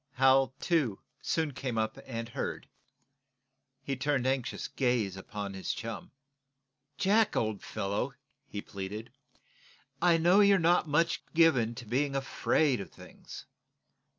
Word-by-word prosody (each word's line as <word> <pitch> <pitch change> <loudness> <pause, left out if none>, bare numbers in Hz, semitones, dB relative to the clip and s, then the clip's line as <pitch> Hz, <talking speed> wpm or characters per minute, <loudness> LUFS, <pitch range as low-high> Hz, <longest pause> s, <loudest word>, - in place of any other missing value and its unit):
Hal, 135 0 +4
too, 145 - +1 0.2
soon 160 -3 -1
came 125 -3 -4
up 110 0 -1
and 115 -2 -5
heard. - - -4 1.2
He 135 0 -2
turned 135 -1 0
anxious 130 -2 -1
gaze 120 -7 0
upon 100 +1 -6
his 95 -1 -3
chum. 115 0 -6 0.9
"Jack, 210 +2 +3
old 110 -2 -1
fellow," 105 +7 -3 0.3
he 100 -5 -5
pleaded, 100 +3 -6 0.9
"I 175 -1 +5
know 175 +4 +5
you're 200 -1 +6
not 175 0 +3
much 165 +3 +1
given 130 -9 +4
to 120 - -8
being 135 +5 0
afraid 135 -1 +1
of - - -8
things. - - -12
130 Hz, 125 wpm, -30 LUFS, 110-160 Hz, 1.2 s, you're